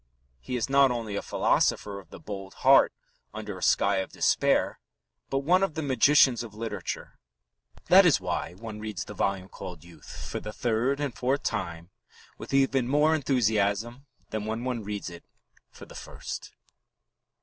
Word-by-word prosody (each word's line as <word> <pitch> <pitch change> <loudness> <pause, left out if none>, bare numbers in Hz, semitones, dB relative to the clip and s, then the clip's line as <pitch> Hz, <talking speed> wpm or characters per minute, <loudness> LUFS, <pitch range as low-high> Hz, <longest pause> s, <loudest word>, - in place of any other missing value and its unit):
He 95 - -5
is 120 - -1
not 135 0 +5
only 115 -4 -3
a - - -1
philosopher 100 -1 +1
of 90 -4 -16
the - - -11
bold 95 -2 -8
heart - - +7 0.4
under 105 -2 -5
a 90 - -10
sky 100 0 +3
of 95 - -3
despair, - - +2 0.5
but 135 0 0
one 180 +6 +4
of 195 -5 0
the 160 - -2
magicians 130 -2 +4
of 115 -3 -9
literature. 115 +1 -5 0.7
That 190 +2 +8
is 170 - +4
why 90 -2 -3
one 105 +2 -8
reads 105 -4 -5
the - - -8
volume 95 -1 -1
called 90 -5 -9
Youth 85 -4 -11
for - - -4
the 105 - -7
third 120 +5 0
and 140 -6 -3
fourth 135 +3 0
time 85 -4 -4 0.5
with - - -8
even 135 -2 +2
more 150 +4 +3
enthusiasm 120 -3 0 0.2
than 110 -1 -3
when 110 +2 -3
one 125 -3 -2
reads 100 -2 -5
it 85 - -11 0.5
for - - -13
the - - -14
first. - - -7
110 Hz, 170 wpm, -27 LUFS, 100-135 Hz, 0.7 s, That